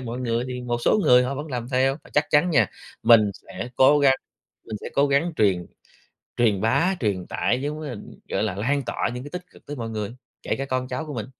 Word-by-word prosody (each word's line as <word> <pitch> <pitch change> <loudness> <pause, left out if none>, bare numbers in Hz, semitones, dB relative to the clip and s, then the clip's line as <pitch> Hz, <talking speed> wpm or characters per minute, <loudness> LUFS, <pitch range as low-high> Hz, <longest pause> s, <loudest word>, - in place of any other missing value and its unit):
mọi 120 0 -5
người 120 0 -1
thì 125 0 -4
một 120 -1 -2
số - - +4
người 125 0 +6
họ 135 +2 -2
vẫn 145 +3 -5
làm 125 -4 -4
theo. 135 +1 +2
Và - - -16
chắc 145 0 +3
chắn 155 +4 +4
nha, 155 - +4 0.4
mình 110 -3 +6 0.2
sẽ 95 +5 -6
cố 145 +3 +6
gắng 135 -2 +5 0.5
mình 110 - -5
sẽ - - -5
cố 140 +1 +3
gắng 145 +5 +2
truyền 95 -5 +2 0.7
truyền 110 -5 +2
bá, 140 - +2
truyền 100 -6 -1
tải 125 +3 0
giống 150 +2 -3
như 150 - -5
là, 125 - -5 0.3
kiểu - - -1
là, 105 -4 -1
lan 140 +8 0
tỏa - - -1
những 125 +2 -6
cái 145 - -9
tích 180 0 -5
cực - - -19
tới 145 0 -6
mọi 115 -2 -4
người, 105 -1 -3 0.3
kể - - -1
cả 135 - -3
con 130 -1 -2
cháu 130 +5 -4
của 145 - -6
mình. 110 -3 -4
125 Hz, 245 wpm, -24 LUFS, 115-140 Hz, 0.7 s, người